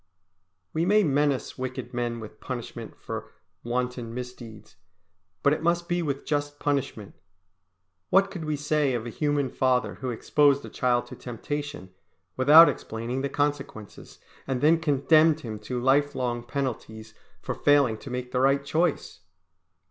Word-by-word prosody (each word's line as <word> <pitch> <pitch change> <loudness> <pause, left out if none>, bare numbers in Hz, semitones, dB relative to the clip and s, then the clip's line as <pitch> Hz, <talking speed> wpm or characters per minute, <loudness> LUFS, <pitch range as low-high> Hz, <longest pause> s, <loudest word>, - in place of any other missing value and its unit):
We 160 - 0
may 210 +4 +4
menace 145 -4 0
wicked 130 0 -5
men 120 -1 -2
with 110 -1 -10
punishment 125 -3 -7
for - - -6 0.3
wanton 120 -1 -3
misdeeds, 120 -7 -9 0.7
but 140 - +4
it - - -3
must 170 +1 +1
be 175 0 0
with 140 -4 -3
just 145 -1 -2
punishment. 135 -8 -2 1.0
What 195 0 +4
could 175 -5 -6
we 155 -1 -1
say 145 -2 0
of 115 -1 -3
a 120 - -5
human 145 -1 0
father 130 -1 0
who 130 - -2
exposed 140 +4 +2
a - - -8
child 125 -2 0
to - - -10
temptation 145 -2 -6 0.4
without 150 +6 +8
explaining 115 +4 -3
the 140 - -2
consequences, 145 -7 -4 0.3
and 130 -2 -1
then 160 +4 +4
condemned 155 +1 +3
him 110 -5 -6
to 125 +4 -4
lifelong 130 -2 +1
penalties 110 -5 -5 0.3
for - - -4
failing 140 -7 +3
to 135 - -9
make 125 0 -5
the 125 - 0
right 140 +1 +2
choice? 160 +2 -1
135 Hz, 150 wpm, -26 LUFS, 120-150 Hz, 1.0 s, without